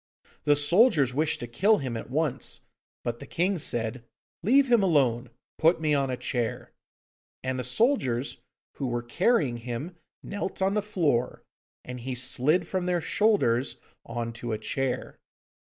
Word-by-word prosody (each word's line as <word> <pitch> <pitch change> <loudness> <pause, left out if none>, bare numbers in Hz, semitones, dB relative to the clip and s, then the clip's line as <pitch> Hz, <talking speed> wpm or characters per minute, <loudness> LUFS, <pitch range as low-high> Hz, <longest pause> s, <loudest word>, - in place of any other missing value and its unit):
The 145 -1 +5
soldiers 145 - +4
wished 150 +3 0
to 120 - -4
kill 200 - +3
him 130 -4 -4
at 115 - -6
once, 140 -2 -1 0.4
but 120 0 -3
the 140 - -10
king 180 +4 0
said, 115 -4 -1 0.4
'Leave 265 +9 +4
him 235 -3 +6
alone, 130 -9 +2 0.3
put 165 +2 +4
me 155 -2 +1
on 140 -2 +1
a 125 - -2
chair,' 120 -3 -3 0.7
and 130 0 -2
the - - -2
soldiers 130 - +1 0.4
who 135 - -2
were 120 -1 -2
carrying 150 - +1
him 125 +9 -6 0.3
knelt 200 -2 -4
on 190 +1 +1
the 210 - +1
floor, 155 - 0 0.4
and 125 0 -6
he 125 +2 -4
slid 150 +7 +2
from 185 -1 -2
their 180 -1 +1
shoulders 160 - +1 0.3
on 115 0 -4
to 115 0 -4
a - - -1
chair. 125 +4 -3
140 Hz, 155 wpm, -27 LUFS, 120-180 Hz, 0.7 s, him